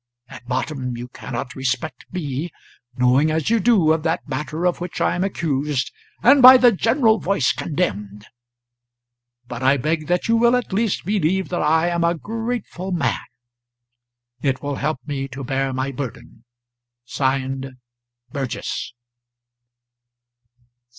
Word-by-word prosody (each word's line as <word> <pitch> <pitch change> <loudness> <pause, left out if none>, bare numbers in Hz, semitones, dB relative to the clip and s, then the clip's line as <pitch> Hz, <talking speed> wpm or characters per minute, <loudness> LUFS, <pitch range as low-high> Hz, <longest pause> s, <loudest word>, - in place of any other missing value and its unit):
At 125 - -12
bottom 125 -1 -3
you 120 +1 -7
cannot 125 0 -6
respect 130 +2 -3
me, 155 -2 -3 0.5
knowing 125 +5 +3
as 155 +4 0
you 230 - +4
do 195 -8 +4
of 160 - -1
that 160 0 -2
matter 150 +5 -3
of 175 -1 0
which 175 0 -5
I - - +2
am 180 - -1
accused, 145 -6 -1 0.3
and 275 +3 +6
by 255 +1 +11
the 250 -1 +6
general 225 +2 +2
voice 175 -9 +1
condemned; 105 - -3 1.2
but 120 0 -6
I 135 +2 +4
beg 155 +3 -1
that 180 0 0
you 230 0 +3
will 235 +1 +4
at 250 -5 -2
least 215 -3 0
believe 190 -1 0
that 175 - -1
I 160 +3 +3
am 170 -1 0
a 170 0 +1
grateful 225 -2 -4
man; 155 -9 0 1.2
it 135 -1 -1
will 145 -1 -3
help 150 -1 -1
me 140 -2 -3
to 135 +1 -8
bear 135 +1 -1
my 130 +1 -2
burden. 125 -3 -8 0.6
[Signed] 135 0 -2 0.6
'BURGESS.'" 135 -3 -4
155 Hz, 140 wpm, -21 LUFS, 130-185 Hz, 1.2 s, by